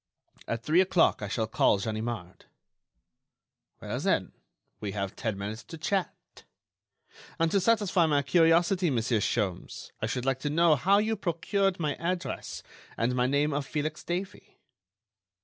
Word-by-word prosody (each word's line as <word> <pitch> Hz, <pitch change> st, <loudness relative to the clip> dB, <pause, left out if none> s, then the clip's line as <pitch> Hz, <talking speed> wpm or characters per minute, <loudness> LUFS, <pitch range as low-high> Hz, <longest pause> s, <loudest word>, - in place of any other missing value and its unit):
At 115 Hz, 0 st, -3 dB
three 165 Hz, +4 st, +4 dB
o'clock 180 Hz, -8 st, +3 dB
I 100 Hz, -, -3 dB
shall 110 Hz, +2 st, -1 dB
call 110 Hz, -1 st, +3 dB
Ganimard." 110 Hz, -3 st, -5 dB, 1.3 s
"Well, -, -, -4 dB
then, -, -, 0 dB, 0.5 s
we 100 Hz, -2 st, -4 dB
have 100 Hz, -2 st, -3 dB
ten 110 Hz, -4 st, -3 dB
minutes 105 Hz, +3 st, -5 dB
to 165 Hz, -, -9 dB
chat. 185 Hz, +4 st, -1 dB, 1.2 s
And 165 Hz, 0 st, +1 dB
to 200 Hz, -, +3 dB
satisfy 195 Hz, -4 st, +3 dB
my 145 Hz, -2 st, +2 dB
curiosity, 170 Hz, +4 st, +3 dB
Monsieur 115 Hz, -3 st, +1 dB
Sholmes, 100 Hz, -4 st, -2 dB
I 110 Hz, -, 0 dB
should 125 Hz, +2 st, -3 dB
like 135 Hz, -1 st, 0 dB
to 145 Hz, -, -2 dB
know 165 Hz, +1 st, +4 dB
how 190 Hz, +9 st, +3 dB
you 220 Hz, +2 st, +1 dB
procured 190 Hz, +1 st, 0 dB
my 150 Hz, -3 st, 0 dB
address 175 Hz, +1 st, -4 dB, 0.3 s
and 120 Hz, +2 st, +1 dB
my 125 Hz, 0 st, +2 dB
name 145 Hz, +2 st, +1 dB
of 140 Hz, -1 st, -2 dB
Felix 155 Hz, 0 st, -3 dB
Davey?" 185 Hz, +3 st, -5 dB
150 Hz, 150 wpm, -28 LUFS, 115-175 Hz, 1.3 s, three